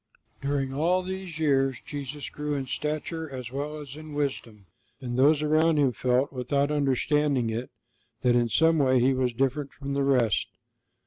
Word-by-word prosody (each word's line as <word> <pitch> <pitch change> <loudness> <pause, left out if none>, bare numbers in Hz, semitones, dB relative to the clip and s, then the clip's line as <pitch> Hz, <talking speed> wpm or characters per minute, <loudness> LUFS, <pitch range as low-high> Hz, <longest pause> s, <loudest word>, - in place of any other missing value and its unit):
During 140 -1 -1
all 175 +6 +1
these 190 -3 -6
years 135 -4 +2
Jesus 145 0 -6
grew 150 0 -3
in 135 -1 -2
stature 155 +4 -3
as 125 -3 -7
well 145 +3 -4
as 140 -2 -9
in 155 0 -9
wisdom, 120 -8 -3 0.3
and 120 -2 -4
those 145 +4 +4
around 155 +1 +3
Him 140 -3 +3
felt, 125 +4 0
without 140 +3 0
understanding 140 -3 +1
it, 115 +3 -4 0.5
that 125 -1 +4
in 120 -1 +2
some 160 +5 +3
way 130 -2 +4
He 130 +2 +3
was 130 -1 0
different 135 +3 -1
from 140 -1 -6
the 140 0 +1
rest. 125 -6 +2
140 Hz, 170 wpm, -27 LUFS, 130-150 Hz, 0.5 s, those